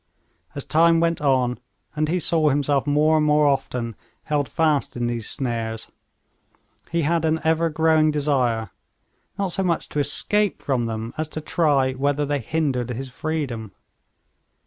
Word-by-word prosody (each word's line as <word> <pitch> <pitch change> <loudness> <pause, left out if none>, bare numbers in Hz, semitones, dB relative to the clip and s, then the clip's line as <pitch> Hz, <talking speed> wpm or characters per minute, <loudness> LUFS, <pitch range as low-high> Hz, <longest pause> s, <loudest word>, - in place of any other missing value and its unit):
As 140 - -3
time 165 +1 +4
went 165 -1 0
on, 130 -4 +1 0.4
and 155 0 0
he 180 +2 +1
saw 160 -2 +2
himself 145 0 +1
more 150 +2 +3
and 155 - +2
more 150 0 +4
often 125 -5 -1 0.3
held 145 -3 -1
fast 155 -6 0
in 120 - -1
these 120 -2 -2
snares, 115 -4 -3 1.0
he 170 0 0
had 165 +2 +1
an 160 0 +1
ever 160 +1 +2
growing 160 0 +3
desire, 130 -8 0 0.7
not 195 -2 -1
so 190 - 0
much 175 -3 0
to 150 - -2
escape 200 +8 +2
from 125 -4 -1
them, 110 +1 -5
as 155 -1 -2
to 155 - -5
try 145 -4 +1
whether 145 +2 0
they 145 0 -1
hindered 130 -2 -1
his 130 +2 -5
freedom. 125 -7 -4
145 Hz, 155 wpm, -23 LUFS, 125-160 Hz, 1.0 s, time